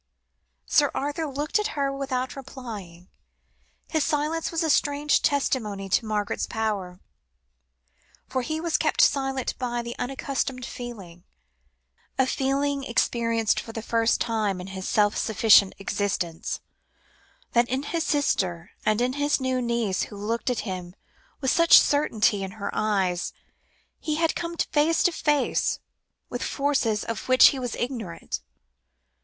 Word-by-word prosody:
Sir 290 Hz, -3 st, +4 dB
Arthur 290 Hz, +3 st, -2 dB
looked 290 Hz, +7 st, -1 dB
at 420 Hz, -, -3 dB
her 275 Hz, -1 st, 0 dB
without 260 Hz, -2 st, -3 dB
replying. 220 Hz, -10 st, -9 dB, 0.8 s
His 315 Hz, -2 st, +1 dB
silence 305 Hz, +3 st, 0 dB
was 330 Hz, -1 st, 0 dB
a 320 Hz, -, 0 dB
strange 290 Hz, 0 st, +2 dB
testimony 220 Hz, -9 st, 0 dB
to 220 Hz, +4 st, +1 dB
Margaret's 210 Hz, -1 st, -1 dB
power, 205 Hz, -5 st, -3 dB, 1.3 s
for 260 Hz, -, -1 dB
he 315 Hz, +5 st, -3 dB
was 330 Hz, -1 st, +1 dB
kept -, -, +2 dB
silent 270 Hz, -2 st, +1 dB
by 240 Hz, -2 st, -2 dB
the 235 Hz, 0 st, -6 dB
unaccustomed 260 Hz, 0 st, -2 dB
feeling 195 Hz, -10 st, -8 dB, 0.9 s
(a 265 Hz, -, +4 dB
feeling 275 Hz, +2 st, 0 dB
experienced 230 Hz, -2 st, +1 dB
for 225 Hz, -, -8 dB
the 225 Hz, -, -5 dB
first 230 Hz, 0 st, +2 dB
time 215 Hz, -5 st, 0 dB
in 180 Hz, -, -6 dB
his 190 Hz, -1 st, -4 dB
self 205 Hz, -1 st, +3 dB
sufficient 215 Hz, -3 st, +5 dB
existence) 195 Hz, -4 st, -2 dB, 0.9 s
that 240 Hz, 0 st, +3 dB
in 265 Hz, +2 st, -1 dB
his 330 Hz, +2 st, -1 dB
sister, 185 Hz, -, 0 dB
and 215 Hz, +1 st, +2 dB
in 250 Hz, +1 st, +2 dB
the 290 Hz, +2 st, +1 dB
new 260 Hz, -1 st, 0 dB
niece 235 Hz, -5 st, 0 dB
who -, -, -11 dB
looked 225 Hz, +5 st, -2 dB
at 245 Hz, -, 0 dB
him 185 Hz, -3 st, -6 dB, 0.5 s
with 265 Hz, -1 st, +2 dB
such 335 Hz, 0 st, +7 dB
certainty 220 Hz, -8 st, +2 dB
in 190 Hz, 0 st, -5 dB
her 200 Hz, -, -3 dB
eyes, 190 Hz, -4 st, 0 dB, 0.7 s
he 305 Hz, -, -2 dB
had 330 Hz, +1 st, +1 dB
come 340 Hz, 0 st, -4 dB
face 320 Hz, +2 st, +2 dB
to 355 Hz, -, +4 dB
face 295 Hz, -3 st, +1 dB, 0.5 s
with -, -, -5 dB
forces 275 Hz, -7 st, 0 dB
of 230 Hz, +1 st, -5 dB
which 255 Hz, 0 st, +8 dB
he 270 Hz, -, -3 dB
was 245 Hz, -2 st, -3 dB
ignorant. 235 Hz, -9 st, -4 dB
245 Hz, 140 wpm, -25 LUFS, 210-285 Hz, 1.3 s, which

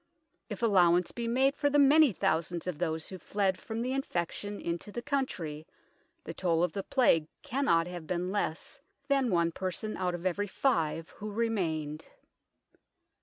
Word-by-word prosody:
If 210 Hz, +1 st, -6 dB
allowance 180 Hz, -5 st, +4 dB
be 235 Hz, -1 st, -4 dB
made 265 Hz, +4 st, +2 dB
for 290 Hz, 0 st, +1 dB
the 290 Hz, -, +2 dB
many 290 Hz, 0 st, +6 dB
thousands 170 Hz, -1 st, -1 dB
of 180 Hz, -5 st, -4 dB
those 160 Hz, -2 st, -2 dB
who 185 Hz, -, -7 dB
fled 195 Hz, +1 st, 0 dB
from 225 Hz, +1 st, -4 dB
the 255 Hz, -, -2 dB
infection 205 Hz, -5 st, -3 dB
into 170 Hz, +4 st, -4 dB
the 240 Hz, +3 st, -5 dB
country, 175 Hz, -, -3 dB, 0.6 s
the -, -, -6 dB
toll 170 Hz, -2 st, +1 dB
of 175 Hz, -3 st, 0 dB
the 200 Hz, -, -2 dB
Plague 165 Hz, -9 st, +3 dB, 0.2 s
cannot 260 Hz, -, +2 dB
have 175 Hz, -2 st, -7 dB
been 180 Hz, +1 st, -2 dB
less 180 Hz, -6 st, -3 dB, 0.3 s
than 275 Hz, -3 st, +3 dB
one 170 Hz, -3 st, +2 dB
person 190 Hz, +5 st, -3 dB
out 180 Hz, -1 st, -1 dB
of 175 Hz, +1 st, -8 dB
every 200 Hz, +3 st, 0 dB
five 165 Hz, -, 0 dB
who 210 Hz, +1 st, -7 dB
remained. 165 Hz, -9 st, -2 dB
185 Hz, 165 wpm, -30 LUFS, 170-235 Hz, 0.6 s, many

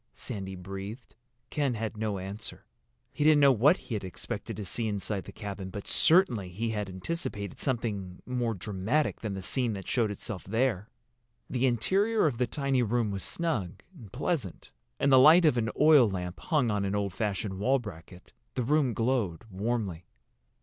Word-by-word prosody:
Sandy 95 Hz, -2 st, -6 dB
breathed. 95 Hz, +6 st, -8 dB, 0.4 s
Ken 140 Hz, -5 st, 0 dB
had 110 Hz, 0 st, -3 dB
no 105 Hz, -2 st, -2 dB
answer. 100 Hz, +4 st, -7 dB, 0.5 s
He -, -, -2 dB
didn't 155 Hz, -1 st, +6 dB
know 140 Hz, -1 st, +7 dB
what 135 Hz, -, +5 dB
he -, -, -8 dB
had 105 Hz, -, -2 dB
expected 90 Hz, -2 st, -5 dB
to 105 Hz, -, -5 dB
see 115 Hz, +4 st, -2 dB
inside 100 Hz, -1 st, -3 dB
the -, -, -9 dB
cabin, 100 Hz, -3 st, -6 dB
but 100 Hz, +1 st, -7 dB
certainly 125 Hz, -, +3 dB
he 110 Hz, +6 st, -2 dB
had 105 Hz, -3 st, -3 dB
anticipated 100 Hz, -, -4 dB
something 105 Hz, -8 st, -2 dB
more 120 Hz, -3 st, -1 dB
dramatic 105 Hz, -, -1 dB
than 105 Hz, -3 st, -3 dB
the 95 Hz, -, -6 dB
scene 125 Hz, +1 st, 0 dB
that 95 Hz, -2 st, -7 dB
showed 115 Hz, -4 st, +1 dB
itself 105 Hz, -1 st, -6 dB
there. 110 Hz, -1 st, 0 dB, 0.6 s
The 130 Hz, +1 st, +2 dB
interior 195 Hz, -, +2 dB
of 130 Hz, -6 st, 0 dB
the 125 Hz, -, +2 dB
tiny 140 Hz, -3 st, 0 dB
room 115 Hz, -1 st, +1 dB
was 100 Hz, -1 st, -4 dB
snug 115 Hz, -, -3 dB
and 110 Hz, -, -12 dB
pleasant. 130 Hz, -, -3 dB, 0.3 s
In 140 Hz, -, +3 dB
the 130 Hz, -, +8 dB
light 160 Hz, +6 st, +8 dB
of 150 Hz, -, +5 dB
an 115 Hz, -2 st, 0 dB
oil 150 Hz, -6 st, +7 dB
lamp, 90 Hz, -2 st, -4 dB
hung 145 Hz, -9 st, +1 dB
on 105 Hz, -1 st, 0 dB
an 100 Hz, +1 st, -1 dB
old 100 Hz, -2 st, -1 dB
fashioned 100 Hz, -1 st, -2 dB
wall 130 Hz, +7 st, +3 dB
bracket, 90 Hz, -6 st, -10 dB, 0.2 s
the 125 Hz, -, 0 dB
room 135 Hz, -2 st, +2 dB
glowed 115 Hz, -8 st, 0 dB
warmly. 100 Hz, -4 st, -2 dB
110 Hz, 175 wpm, -29 LUFS, 95-130 Hz, 0.6 s, the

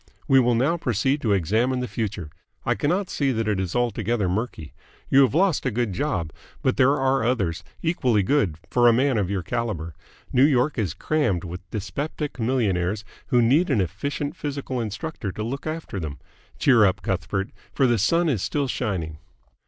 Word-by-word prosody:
We 135 Hz, -, +6 dB
will 120 Hz, -1 st, +3 dB
now 140 Hz, +9 st, +2 dB
proceed 130 Hz, -, 0 dB
to 110 Hz, -4 st, +2 dB
examine 110 Hz, +8 st, +1 dB
the 125 Hz, -, -2 dB
future. 105 Hz, -10 st, -4 dB, 0.3 s
I 120 Hz, -, +3 dB
cannot 175 Hz, -, 0 dB
see 140 Hz, -5 st, 0 dB
that 115 Hz, -1 st, -1 dB
it 105 Hz, -3 st, +1 dB
is 95 Hz, -2 st, -3 dB
altogether 115 Hz, -3 st, 0 dB
murky. 90 Hz, -5 st, -3 dB, 0.4 s
You 135 Hz, -, +6 dB
have 135 Hz, +1 st, +3 dB
lost 180 Hz, -2 st, +3 dB
a 125 Hz, -, +1 dB
good 115 Hz, -3 st, -1 dB
job, 90 Hz, -, -2 dB, 0.3 s
but 130 Hz, -, +2 dB
there 135 Hz, +3 st, +4 dB
are 135 Hz, -1 st, +2 dB
others, 95 Hz, -8 st, 0 dB, 0.2 s
equally 130 Hz, -, +2 dB
good, 100 Hz, -, +1 dB
for 120 Hz, -1 st, +3 dB
a 120 Hz, -, +7 dB
man 130 Hz, -1 st, +2 dB
of 95 Hz, -3 st, -1 dB
your 100 Hz, -3 st, -2 dB
calibre. 100 Hz, -7 st, -3 dB, 0.4 s
New 130 Hz, -, +5 dB
York 140 Hz, -1 st, +3 dB
is 95 Hz, -7 st, -1 dB
crammed 145 Hz, -, 0 dB
with 90 Hz, +1 st, -8 dB
dyspeptic 145 Hz, +7 st, -4 dB
millionaires 105 Hz, -5 st, 0 dB, 0.2 s
who 120 Hz, -1 st, +3 dB
need 150 Hz, +10 st, +3 dB
an 130 Hz, -7 st, +2 dB
efficient 140 Hz, -, -2 dB
physical 140 Hz, -4 st, -3 dB
instructor 110 Hz, -, -4 dB
to 105 Hz, -, -4 dB
look 135 Hz, +7 st, -4 dB
after 155 Hz, -10 st, -4 dB
them. 75 Hz, -4 st, -5 dB, 0.4 s
Cheer 120 Hz, -5 st, +5 dB
up, 95 Hz, -3 st, +2 dB
Cuthbert, 95 Hz, +1 st, -2 dB, 0.2 s
for 135 Hz, -, +2 dB
the 120 Hz, -3 st, +3 dB
sun 165 Hz, -, +2 dB
is 125 Hz, -, 0 dB
still 145 Hz, +4 st, -1 dB
shining!" 90 Hz, -12 st, -3 dB
120 Hz, 185 wpm, -24 LUFS, 100-135 Hz, 0.4 s, a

